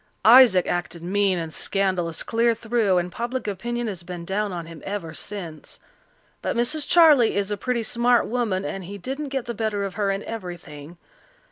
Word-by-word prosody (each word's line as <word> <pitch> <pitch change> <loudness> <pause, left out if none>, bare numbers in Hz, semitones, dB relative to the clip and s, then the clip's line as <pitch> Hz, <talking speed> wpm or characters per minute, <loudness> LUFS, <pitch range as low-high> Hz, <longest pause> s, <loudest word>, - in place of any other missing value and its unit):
Isaac 225 -6 +8
acted 170 -1 -3
mean 195 +1 +1
and 165 -2 -5
scandalous 185 -4 -1
clear 230 0 +2
through, 225 -4 +1
and 175 0 -1
public 240 +3 -4
opinion 240 +5 -3
has 195 -6 -5
been 175 -1 -7
down 205 +2 -1
on 170 -2 -5
him 165 -1 -11
ever 195 -6 -5
since. 170 -5 -7 0.6
But - - -2
Mrs. 290 +6 0
Charley 305 -9 +6
is 200 0 -1
a - - +1
pretty 240 +2 -2
smart 240 +2 +2
woman, 215 -6 -1
and 195 -2 -5
he 200 +3 -7
didn't 275 +8 -5
get 270 -3 -3
the 235 - -4
better 215 -2 -2
of 195 -2 -4
her 205 0 -1
in 195 +1 -2
everything. 175 -6 -8
205 Hz, 180 wpm, -24 LUFS, 180-235 Hz, 0.6 s, Isaac